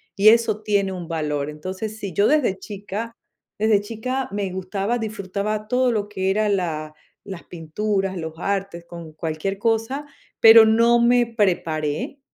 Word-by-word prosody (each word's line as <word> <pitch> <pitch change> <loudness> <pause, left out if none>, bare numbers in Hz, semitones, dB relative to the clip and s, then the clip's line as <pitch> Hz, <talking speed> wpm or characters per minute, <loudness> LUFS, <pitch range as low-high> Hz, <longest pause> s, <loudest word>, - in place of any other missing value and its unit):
Y 205 +2 +6
eso 225 -2 +3
tiene 200 -2 +1
un 175 -3 -6
valor. 150 -3 -2
Entonces, 185 +8 -6
si 200 -3 -5
yo 200 +5 +3
desde 265 -11 +2
chica 205 +3 -6 0.4
desde 215 -2 +3
chica 255 +5 -3
me 200 -2 -3
gustaba, 195 +5 -2
disfrutaba 210 -1 -3
todo 250 +2 +2
lo 210 -2 -2
que 190 -2 -2
era 215 +1 +1
la 160 -6 -2 0.3
las 190 -4 -8
pinturas, 190 +3 -3
los 160 -2 -5
artes, 195 -1 -3
con 170 -2 -10
cualquier 160 +5 -3
cosa, 225 +6 -1 0.4
pero 225 0 +9
no 230 +2 +4
me 240 0 +4
preparé 175 - -1
200 Hz, 150 wpm, -22 LUFS, 180-220 Hz, 0.4 s, pero